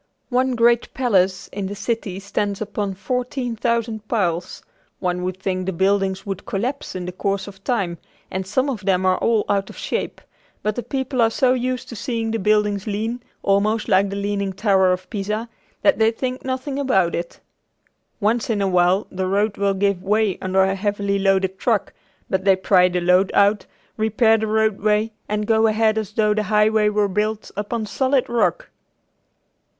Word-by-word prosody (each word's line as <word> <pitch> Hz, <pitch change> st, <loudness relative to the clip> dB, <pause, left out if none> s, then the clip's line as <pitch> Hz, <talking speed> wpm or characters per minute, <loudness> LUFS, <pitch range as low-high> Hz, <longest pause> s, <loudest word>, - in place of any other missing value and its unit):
One 255 Hz, 0 st, +1 dB
great 235 Hz, 0 st, +3 dB
palace 190 Hz, -8 st, +1 dB
in 200 Hz, -1 st, -4 dB
the 200 Hz, -, -5 dB
city 205 Hz, -3 st, -3 dB
stands 200 Hz, 0 st, -2 dB
upon 205 Hz, -2 st, -3 dB
fourteen 250 Hz, +3 st, -3 dB
thousand 225 Hz, -2 st, -1 dB
piles. 180 Hz, -6 st, -1 dB, 0.4 s
One 180 Hz, -1 st, -1 dB
would 185 Hz, 0 st, -3 dB
think 185 Hz, -1 st, -3 dB
the -, -, +1 dB
buildings 195 Hz, +1 st, +1 dB
would 195 Hz, -1 st, -4 dB
collapse 245 Hz, +7 st, -3 dB
in 180 Hz, -1 st, -4 dB
the 180 Hz, -, -4 dB
course 195 Hz, +2 st, -2 dB
of 195 Hz, -1 st, -12 dB
time, 195 Hz, -9 st, -1 dB, 0.3 s
and 190 Hz, 0 st, -3 dB
some 260 Hz, +7 st, +1 dB
of 235 Hz, -8 st, -3 dB
them 190 Hz, -1 st, +1 dB
are 185 Hz, 0 st, +3 dB
all 225 Hz, -2 st, +2 dB
out 195 Hz, -1 st, 0 dB
of -, -, -11 dB
shape, -, -, -3 dB, 0.4 s
but 215 Hz, -, 0 dB
the 245 Hz, -, -2 dB
people 260 Hz, +1 st, -2 dB
are 225 Hz, -, +5 dB
so 250 Hz, +2 st, +2 dB
used 255 Hz, 0 st, -2 dB
to 235 Hz, -, -7 dB
seeing 225 Hz, +1 st, -2 dB
the 225 Hz, -, -1 dB
buildings 210 Hz, 0 st, +1 dB
lean, 220 Hz, +4 st, -2 dB, 0.2 s
almost 210 Hz, +3 st, +1 dB
like 195 Hz, +1 st, +3 dB
the 200 Hz, -, -4 dB
Leaning 200 Hz, -1 st, -2 dB
Tower 190 Hz, -2 st, +3 dB
of 180 Hz, 0 st, -2 dB
Pisa, 215 Hz, +2 st, -2 dB, 0.4 s
that 295 Hz, -, +4 dB
they 220 Hz, 0 st, +5 dB
think 255 Hz, +3 st, -4 dB
nothing 260 Hz, +2 st, -3 dB
about 190 Hz, -11 st, +2 dB
it. 170 Hz, 0 st, -4 dB, 0.8 s
Once 225 Hz, +3 st, +1 dB
in 220 Hz, -3 st, +1 dB
awhile 185 Hz, 0 st, +2 dB
the 185 Hz, 0 st, -2 dB
road 200 Hz, +2 st, +1 dB
will 200 Hz, -1 st, 0 dB
give 200 Hz, -1 st, +1 dB
way 205 Hz, 0 st, +1 dB
under 190 Hz, +1 st, +2 dB
a 190 Hz, 0 st, +1 dB
heavily 200 Hz, 0 st, -1 dB
loaded 195 Hz, -1 st, +1 dB
truck, 225 Hz, -5 st, 0 dB, 0.3 s
but 190 Hz, 0 st, -1 dB
they 195 Hz, -1 st, +5 dB
pry 185 Hz, -1 st, +4 dB
the 180 Hz, 0 st, -1 dB
load 180 Hz, +2 st, +4 dB
out, 200 Hz, +1 st, +3 dB, 0.3 s
repair 220 Hz, +1 st, +3 dB
the 220 Hz, -, -2 dB
roadway, 215 Hz, 0 st, +1 dB, 0.2 s
and 210 Hz, 0 st, -1 dB
go 225 Hz, +1 st, +3 dB
ahead 215 Hz, 0 st, +2 dB
as 210 Hz, -1 st, -6 dB
though 215 Hz, -1 st, +2 dB
the 215 Hz, -, 0 dB
highway 210 Hz, 0 st, +3 dB
were 210 Hz, -1 st, +1 dB
built 210 Hz, +2 st, -2 dB
upon 215 Hz, +2 st, -3 dB
solid 260 Hz, +4 st, +1 dB
rock. 235 Hz, -1 st, 0 dB
210 Hz, 180 wpm, -21 LUFS, 190-225 Hz, 0.8 s, are